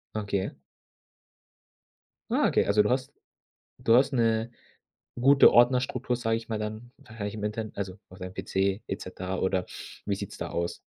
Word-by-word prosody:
Okay. 100 -2 -2 1.7
Ah, - - +3
okay, - - +2
also 105 +1 +4
du 105 - 0
hast 130 +2 -1 0.7
du 115 - +4
hast 135 +2 +4
'ne 115 -1 +1 0.7
gute 140 +2 +7
Ordnerstruktur, 125 0 +3
sage 115 -2 0
ich 115 - -10
mal, 110 - -1
dann 110 +3 -5
wahrscheinlich 110 -2 -7
im 105 - -6
Internet 110 +1 -4
also 95 -1 -4
auf 90 - -13
deinem 90 -1 -7
PC 95 +2 -1
et - - -3
cetera 95 +1 -5
oder 95 -1 0 0.4
wie - - +1
sieht's - - -7
da - - -4
aus? 85 0 -2
110 Hz, 160 wpm, -28 LUFS, 100-120 Hz, 1.7 s, gute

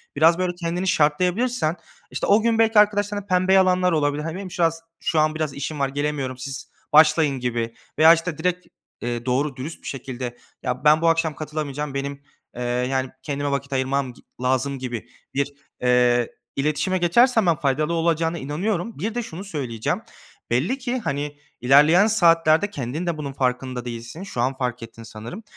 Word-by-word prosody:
biraz 165 +4 +5
böyle 180 -1 -1
kendini 175 +1 -2
şartlayabilirsen 180 +5 +1 0.4
işte - - -2
o 205 +2 +5
gün 230 0 +1
belki 225 -1 +5
arkadaşlarına 205 -1 +2
pembe 185 -1 +2
yalanlar 185 -1 +4
olabilir. 150 -2 0
Hani 165 +1 -4
benim 190 -1 -7
şıraz 165 -1 0 0.2
şu 160 - 0
an 155 0 +2
biraz 155 -3 -2
işim 145 +2 -5
var, 140 -1 +1
gelemiyorum 140 -2 -2
siz 130 +1 -7 0.2
başlayın 155 -2 +5
gibi. 120 -2 -2 0.2
Veya 160 +1 +9
işte 165 -1 -2
direkt, 180 +2 -1 0.3
eee, 120 0 -3
doğru 135 +2 0
dürüst 140 +6 -7
bir - - -8
şekilde, 125 -2 -5 0.3
ya, 125 +2 -3
ben 155 +1 +5
bu 165 - +2
akşam 165 -2 +1
katılamayacağım. 150 -2 -4
Benim, 140 0 -4 0.3
eee, 125 - -4
yani, 125 +2 -1
kendime 145 -1 -2
vakit 140 0 -3
ayırmam 130 0 0
gi - - -19 0.2
lazım 130 +2 0
gibi 120 -3 -5 0.2
bir, 140 +1 -1 0.3
eee, 125 -1 +3 0.3
iletişime 150 +6 0
geçersen 225 +6 +4
ben 170 -2 +4
faydalı 150 +3 0
olacağına 165 0 +1
inanıyorum. 175 - -3
Bir 215 +7 -3
de 240 - -1
şunu 185 -3 -8
söyleyeceğim. 130 - -3 0.5
Belli 145 - +1
ki, 255 -1 -2
hani, 145 - -3 0.2
ilerleyen 150 - +6
saatlerde 165 -3 +4
kendin 145 0 -4
de 170 -2 -1
bunun 140 -2 -5
farkında 125 -1 -2
değilsin. 120 +7 -7
Şu 160 -11 -4
an 130 +2 +1
fark 125 -2 -3
ettin 115 0 -11
sanırım. 115 - -9
150 Hz, 170 wpm, -23 LUFS, 130-175 Hz, 0.5 s, Veya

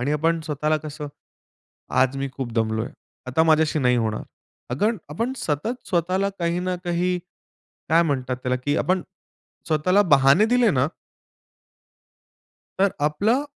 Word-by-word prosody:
आणि 140 +4 0
आपण 165 +2 +1
स्वतःला 150 +1 0
कसं, 150 -1 -6 0.8
आज 130 +1 +2
मी 135 0 -2
खूप 130 -2 -5
दमलो 110 -1 0
आहे. - - -8 0.3
आता 145 +6 +2
माझ्याशी 155 -1 +3
नाही 125 -2 +3
होणार. 110 -2 -1 0.5
अगर 205 - +1 0.2
आपण 230 - -2
सतत 220 - -3
स्वतःला 185 +2 +1
काही 170 +1 0
ना 185 0 -1
काही 180 +1 0 0.7
काय 165 +2 +5
म्हणतात 130 -4 -1
त्याला, 125 0 +1
की 145 +3 -1
आपण 185 0 +1 0.7
स्वतःला 175 +6 +3
बहाने 140 +8 +6
दिले 245 0 +3
ना 130 0 +2 1.9
तर 200 - +4
आपलं 205 - +2
155 Hz, 135 wpm, -23 LUFS, 135-180 Hz, 1.9 s, बहाने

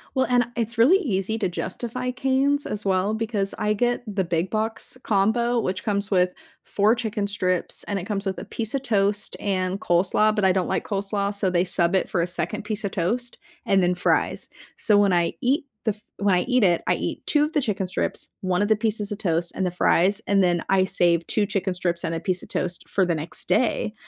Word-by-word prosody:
Well, 260 - +2
and 245 -1 +3
it's 230 0 -1
really 275 +12 +6
easy 220 - -1
to 200 - +1
justify 240 +8 -4
Cane's, 270 +3 +1
as 210 0 -4
well, 190 +2 +1
because 220 -3 -2
I 210 0 0
get 245 +3 0
the 190 -2 0
big 170 +2 -1
box 220 +3 -2
combo 230 +4 +2
which 185 -3 -2
comes 200 -1 -1
with 180 -1 +3 0.3
4 210 +3 +2
chicken 220 -3 -2
strips 185 -3 -1
and 200 - -2
it 185 - -4
comes 200 -1 -3
with 190 -2 -2
a - - -6
piece 220 +4 -3
of 270 - -2
toast 205 -3 0
and 185 -1 -1
coleslaw, 195 +5 +2
but 210 - 0
I 190 - +5
don't 185 -1 0
like - - -1
coleslaw, 200 0 -1
so 200 -2 0
they 175 -1 +2
sub 175 0 +2
it 190 - +1
for 175 - 0
a 170 - 0
2nd 210 +4 -3
piece 210 0 -3
of 200 - -2
toast 235 +7 -2 0.3
and 195 -1 +3
then 180 0 +2
fries, 180 - 0 0.3
so 210 -2 +4
when 200 -2 +4
I 170 -1 +2
eat 280 +4 +1 0.2
the 220 - +3
f 210 - -15 0.2
when 200 -2 +2
I 180 - +2
eat 250 0 +2
it, 175 -3 +3
I - - +3
eat - - -4
2 295 -1 +3
of 300 - -2
the 295 - +2
chicken 200 -5 -2
strips, 185 - -3
1 185 -1 0
of 205 - +2
the 220 - +4
pieces 210 -1 -1
of 205 - -3
toast 170 -4 -1
and 190 - -1
the 180 - -1
fries, 190 +4 +2
and 195 -1 +3
then 175 -2 +2
I 190 -1 +4
save 170 -2 +2
2 210 - +1
chicken 195 -1 -1
strips 175 -1 -2
and 165 - -2
a 165 - -2
piece 185 +1 -2
of - - -12
toast 175 -1 -3
for 190 -2 +2
the 170 -2 0
next 155 +2 -3
day, 210 +2 +1
200 Hz, 230 wpm, -24 LUFS, 185-220 Hz, 0.3 s, really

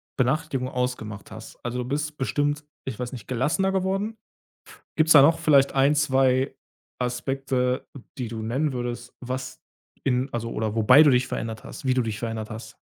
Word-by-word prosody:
Benachrichtigung 135 0 0
ausgemacht 125 -6 -4
hast? 110 +1 -10
Also, 125 +1 -3
du 125 - -2
bist 150 +1 -2
bestimmt, 145 +5 0 0.2
ich 130 -4 -5
weiß 125 0 -4
nicht, 120 -5 -8
gelassener 150 +10 +1
geworden. 195 +3 -1 0.8
Gibt's 160 0 +5
da 145 - +9
noch 160 +4 +5
vielleicht 140 -2 +4
1, 140 +2 +4
2 135 -3 +2 0.4
Aspekte, 125 +1 -1 0.3
die 125 - -2
du 110 -1 -5
nennen 135 +7 0
würdest, 120 -1 -5
was 130 0 -5 0.4
in 130 +1 +1
also, 115 0 -3
oder 110 -1 -2
wobei 125 +7 +7
du 145 - +6
dich 125 -1 +2
verändert 110 -1 -4
hast, - - -10
wie 130 - +3
du 130 - +2
dich 110 -2 -3
verändert 110 -1 -4
hast? 110 +1 -8
130 Hz, 170 wpm, -25 LUFS, 120-145 Hz, 0.8 s, da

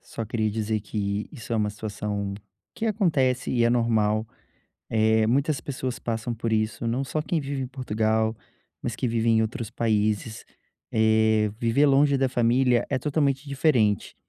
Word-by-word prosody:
só 115 - -6
queria 110 0 -1
dizer 110 0 -1
que 100 0 -3
isso 120 -5 -8
é - - +2
uma 105 -1 +1
situação 105 -1 -4 0.4
que 225 - -3
acontece 150 - +1
e 120 -2 +2
é - - +4
normal, 110 -3 +2 0.7
eh, 110 0 +3
muitas 135 +5 +1
pessoas 130 -2 -4
passam 115 +1 -3
por 115 0 -2
isso, 110 +2 -1
não 120 +4 0
só 145 +3 -3
quem 165 +2 -1
vive 140 -1 -4
em - - -4
Portugal, 110 -3 0 0.4
mas 120 -2 -4
que 125 - -1
vive 115 0 0
em 110 -1 +4
outros 110 0 -3
países, 110 -1 -1 0.5
eh, 110 -1 +3
viver 120 +5 +3
longe 140 +1 +4
da 135 -1 +1
família 120 0 +2
é 135 - +1
totalmente 145 -1 0
diferente. 130 - +1
115 Hz, 165 wpm, -25 LUFS, 110-130 Hz, 0.7 s, é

